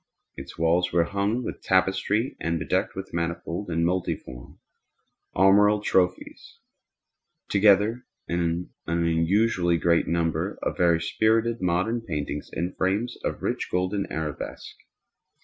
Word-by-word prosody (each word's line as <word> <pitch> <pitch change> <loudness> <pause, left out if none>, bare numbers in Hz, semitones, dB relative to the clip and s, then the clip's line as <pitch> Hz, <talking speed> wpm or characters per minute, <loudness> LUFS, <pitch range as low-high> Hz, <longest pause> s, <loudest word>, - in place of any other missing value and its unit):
Its 70 +1 -10
walls 85 +2 +2
were 85 0 +3
hung 100 +7 -1
with - - -6
tapestry 95 +5 +1
and 85 0 -1
bedecked 90 +4 -1
with 95 0 -7
manifold 85 +3 -3
and 85 0 0
multiform 85 -8 -3 0.8
armorial 105 +3 +5
trophies, 90 -3 -1 0.9
together 105 +4 +4 0.2
with 85 - -1
an 85 +1 -2
unusually 85 +3 +2
great 85 0 +2
number 85 -1 -1
of - - -1
very 85 -2 +3
spirited 110 +6 +1
modern 95 +7 0
paintings 75 -6 -4
in 85 +3 -3
frames 100 +6 -1
of - - -3
rich - - -2
golden 95 +2 -1
arabesque. 80 -2 -5
90 Hz, 120 wpm, -25 LUFS, 85-100 Hz, 0.9 s, armorial